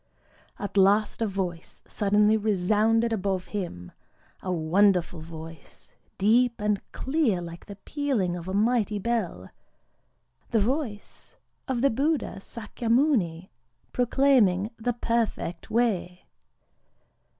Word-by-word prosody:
At 205 0 -5
last 205 +3 +3
a 225 - +2
voice 185 -4 -5
suddenly 210 +1 +2
resounded 220 +3 +2
above 190 -3 -1
him,—a 180 - -8
wonderful 180 +1 +2
voice, 160 -1 -11 0.2
deep 235 +4 +3
and 210 -1 0
clear 265 - 0
like 170 -1 -9
the 200 - -8
pealing 215 -5 -1
of 175 0 -7
a 190 - -3
mighty 215 -1 +2
bell,—the 230 +3 -3 1.1
voice 230 -1 -3 0.3
of 255 -3 -1
the 275 - +4
Buddha 285 -1 0
Sâkyamuni 225 - 0 0.4
proclaiming 245 -6 +3
the 245 +2 -1
Perfect 230 -7 -2
Way. 195 -6 0
210 Hz, 100 wpm, -26 LUFS, 185-235 Hz, 1.1 s, the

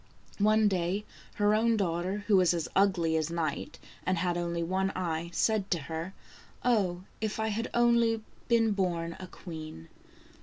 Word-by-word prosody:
One 215 +1 +4
day, 190 +2 0 0.3
her 205 0 +3
own 225 +1 +3
daughter, 185 +2 -1
who 210 - +4
was 180 -2 +4
as 165 - -2
ugly 180 -5 +3
as 155 0 -1
night, 165 -1 -3 0.3
and 185 0 +1
had 175 0 0
only 170 -1 -1
one 190 +3 0
eye, 170 -2 -2
said 205 +3 +1
to 175 - +1
her: 160 +5 -5 0.2
" - - -22
Oh, 190 -7 +2 0.2
if 220 0 -2
I 220 0 0
had 225 +3 -2
only 235 -2 +3 0.3
been 230 -2 +4
born 170 -4 -1
a 185 - -7
queen 155 - -9
185 Hz, 165 wpm, -30 LUFS, 170-215 Hz, 0.3 s, One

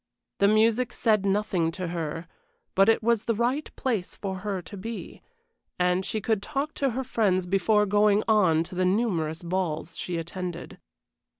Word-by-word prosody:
The 200 - +5
music 225 +3 +3
said 215 -4 +2
nothing 195 -5 +1
to 180 -1 -4
her, 165 0 -4 0.5
but 195 +2 +5
it 225 - +3
was 230 -1 +2
the 230 - +1
right 250 +7 0
place 225 -9 -2
for 190 -2 -4
her 200 -1 -3
to 205 - -10
be, 220 +4 -7 0.6
and 180 +1 +2
she 215 - -2
could 215 -1 0
talk 295 +5 -3
to 275 - 0
her 265 - -1
friends 200 -7 +1
before 200 +3 +2
going 205 +1 +3
on 185 -8 +4
to 170 - -8
the 185 +1 0
numerous 180 -5 0
balls 170 -2 -2
she 175 -1 -3
attended. 175 +1 -6
200 Hz, 170 wpm, -26 LUFS, 180-220 Hz, 0.6 s, The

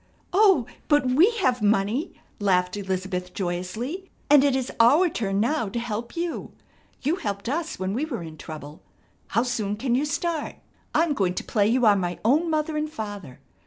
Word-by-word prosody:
"Oh, 385 - +5 0.2
but 295 -3 +3
we 285 - +5
have 250 -2 +2
money," 210 - +1 0.2
laughed 180 -2 +2
Elizabeth 185 -2 -3
joyously, 210 - -4 0.2
"and 290 -2 +8
it 280 -2 +3
is 260 -1 -2
our 290 +11 +6
turn 200 -8 -1
now 235 0 +1
to 235 - -5
help 235 0 -4
you. 340 0 -4 0.5
You 310 +7 +1
helped 200 - -4
us 320 +5 -2
when 190 +1 -2
we 265 +8 -1
were 240 - -5
in 160 -1 -9
trouble. 150 -1 -9 0.5
How 230 +4 +1
soon 220 -5 -2
can 240 +3 -1
you 270 +4 +2
start? 305 +1 -2 0.4
I'm 320 -1 +3
going 185 -8 0
to - - -3
play 205 -2 +1
you 245 +2 +2
are 210 -2 +6
my 180 -2 -2
own 305 +8 +3
father 310 0 0
and 305 0 -2
mother. 205 - -6
235 Hz, 180 wpm, -25 LUFS, 195-295 Hz, 0.5 s, and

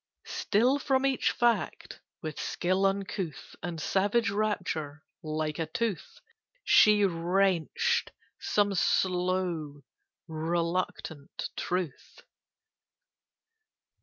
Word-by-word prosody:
Still 245 +7 +2
from 270 -1 +1
each 270 -1 +2
fact, 240 -1 0 0.2
with 155 -2 -5
skill 185 +2 +1
uncouth 195 -5 -4
And 170 -1 -4
savage 205 +7 +1
rapture, 180 -8 -2 0.2
like 155 -1 -3
a 165 - -1
tooth 230 - -3 0.4
She 210 -2 +6
wrenched 180 0 +1 0.3
some 205 -1 +1
slow 180 -4 0 0.4
reluctant 165 -2 -3
truth. 180 -6 -4
185 Hz, 80 wpm, -29 LUFS, 160-205 Hz, 0.4 s, She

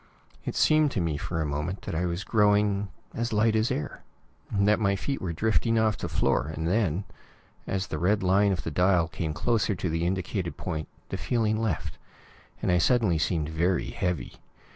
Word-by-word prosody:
It - - -3
seemed 155 -1 +4
to - - 0
me 85 -3 0
for 80 +3 -3
a 80 - 0
moment 75 +6 -3
that - - -5
I 90 +3 0
was 85 +3 -3
growing 105 -2 +2 0.3
as 115 +1 -2
light 110 +1 +3
as 110 +2 +2
air; 75 - -3 0.5
that 105 +1 +3
my 100 -2 +2
feet 135 +8 -3
were 90 - -2
drifting 110 +5 +1
off 110 -1 +3
the - - -5
floor, 65 - +1
and 80 +1 -3
then, 95 -2 +1 0.6
as 95 -1 -1
the 80 - -4
red 100 +3 +2
line 100 +2 +4
of 90 -4 -2
the 80 - -3
dial 90 +1 +3
came 80 -1 -3
closer 105 +5 +1
to 90 - -2
the 80 +1 0
indicated 95 -1 -2
point, 80 -4 -4 0.2
the - - -3
feeling 110 -3 0
left, 110 -8 -2 0.6
and - - +2
I 90 - +4
suddenly 100 -4 +3
seemed 80 -2 0
very 85 +3 0
heavy. 90 -1 -3
95 Hz, 190 wpm, -27 LUFS, 85-105 Hz, 0.6 s, seemed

